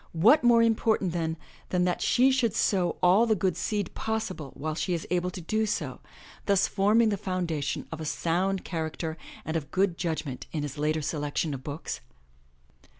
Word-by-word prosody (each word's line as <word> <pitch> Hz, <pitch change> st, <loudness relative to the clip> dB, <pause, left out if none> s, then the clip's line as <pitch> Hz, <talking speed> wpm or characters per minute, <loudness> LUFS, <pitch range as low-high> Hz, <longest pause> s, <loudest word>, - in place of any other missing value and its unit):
What 225 Hz, -, +5 dB
more 235 Hz, -1 st, +6 dB
import 225 Hz, -1 st, +2 dB
ant 185 Hz, -, 0 dB
then, 165 Hz, -1 st, -1 dB, 0.3 s
than 180 Hz, -1 st, +1 dB
that 180 Hz, 0 st, 0 dB
she 255 Hz, +2 st, +4 dB
should 245 Hz, -6 st, +1 dB
sow 180 Hz, -4 st, +2 dB
all 190 Hz, +6 st, +5 dB
the 220 Hz, -, +3 dB
good 185 Hz, -2 st, 0 dB
seed 205 Hz, -4 st, -2 dB
possible 190 Hz, -9 st, -3 dB
while 155 Hz, +2 st, -3 dB
she 175 Hz, +3 st, -1 dB
is 165 Hz, -, -4 dB
able 180 Hz, 0 st, +1 dB
to 180 Hz, -, -7 dB
do 215 Hz, +6 st, 0 dB
so, -, -, -3 dB, 0.5 s
thus 200 Hz, -2 st, +4 dB
forming 215 Hz, +3 st, +3 dB
the 205 Hz, -, 0 dB
foundation 175 Hz, -7 st, -2 dB
of 160 Hz, -1 st, -5 dB
a -, -, -4 dB
sound 180 Hz, +5 st, 0 dB
charac 160 Hz, -3 st, -3 dB
ter 160 Hz, -2 st, -3 dB, 0.3 s
and 160 Hz, -, -3 dB
of 155 Hz, -3 st, -2 dB
good 185 Hz, -2 st, +1 dB
judgment 160 Hz, -6 st, -3 dB
in 150 Hz, -2 st, -2 dB
his 145 Hz, 0 st, -5 dB
later 155 Hz, +1 st, 0 dB
selection 150 Hz, 0 st, -1 dB
of 130 Hz, -1 st, -6 dB
books? 145 Hz, +2 st, -5 dB
180 Hz, 190 wpm, -28 LUFS, 160-205 Hz, 0.5 s, more